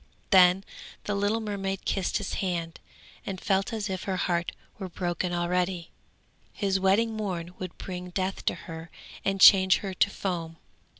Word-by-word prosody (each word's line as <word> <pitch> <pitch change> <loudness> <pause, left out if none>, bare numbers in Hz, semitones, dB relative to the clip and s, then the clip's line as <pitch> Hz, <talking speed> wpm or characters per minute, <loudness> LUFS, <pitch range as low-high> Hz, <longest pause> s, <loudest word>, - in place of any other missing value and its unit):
Then 185 0 +6 0.4
the 205 - -2
little 205 +2 +1
mermaid 195 -2 -3
kissed 195 -3 0
his - - -4
hand, 170 -3 -3 0.4
and 190 -2 -5
felt 195 0 0
as 215 -3 -2
if 190 -2 -4
her 190 -2 -1
heart 175 -1 0 0.3
were 190 -2 -5
broken 175 0 -2
already. 175 0 -1 0.6
His 195 -2 0
wedding 200 +4 +3
morn 180 -5 -4
would 185 -2 -6
bring 180 -1 -6
death 190 +1 -2
to - - +1
her 165 0 -8 0.3
and 195 0 0
change 190 -1 +8
her 190 - -3
to 195 - +3
foam. 170 -5 -4
190 Hz, 160 wpm, -27 LUFS, 175-195 Hz, 0.6 s, change